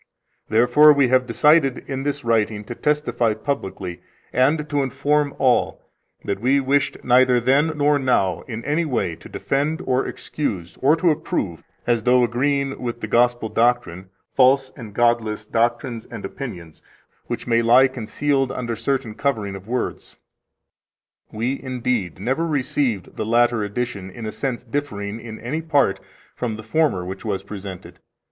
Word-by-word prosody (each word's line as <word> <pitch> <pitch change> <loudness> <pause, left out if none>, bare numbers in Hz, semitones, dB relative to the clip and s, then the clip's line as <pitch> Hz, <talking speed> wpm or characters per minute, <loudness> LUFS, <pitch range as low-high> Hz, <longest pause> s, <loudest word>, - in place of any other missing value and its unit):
Therefore 125 +7 +6
we 140 -3 +3
have 130 0 +3
decided 150 -3 +3
in 135 -1 -3
this 145 0 -3
writing 110 -2 +1
to 120 - -7
testify 135 -6 0
publicly, 95 -7 -4 0.3
and 145 +5 +2
to 145 -1 0
inform 140 +2 0
all, 130 -2 +1 0.4
that 100 - -2
we 135 +3 +3
wished 140 +1 +1
neither 125 0 +4
then 140 +6 +2
nor 145 0 +3
now 100 -9 +1
in 115 -1 -6
any 155 +4 +1
way 120 - -1
to - - -13
defend, 150 +4 -1
or 130 +1 +1
excuse, 115 - -4
or 145 +4 +5
to 170 0 +3
approve, 145 - -3 0.2
as 120 -2 +2
though 125 +2 +4
agreeing 135 +3 0
with 120 -1 -4
the - - -3
Gospel 120 -1 +2
doctrine, 115 -6 0 0.2
false 135 0 +4
and 110 -5 -10
godless 115 -3 +1
doctrines 120 +1 -1
and 115 -4 -7
opinions 90 - -8 0.5
which 120 -1 -4
may 115 -1 +2
lie 125 +3 +6
concealed 135 +2 -1
under 120 -2 -3
certain 125 -2 -2
coverings 110 -7 -2
of 95 +1 -10
words. 125 +1 -4 1.1
We, 120 +6 -2
indeed, 125 - -2
never 130 - -1
received 130 - -1
the 110 - -2
latter 120 -1 +3
edition 105 -2 -4
in 110 +4 -8
a 110 - -3
sense 120 +3 -3
differing 115 -5 -4
in 110 -1 -9
any 150 +7 -3
part 145 -10 +2 0.4
from 115 -3 -3
the 110 - -9
former 110 - +1
which 95 +1 -7
was 100 -3 -2
presented. 100 -2 -9
125 Hz, 155 wpm, -22 LUFS, 110-140 Hz, 1.1 s, Therefore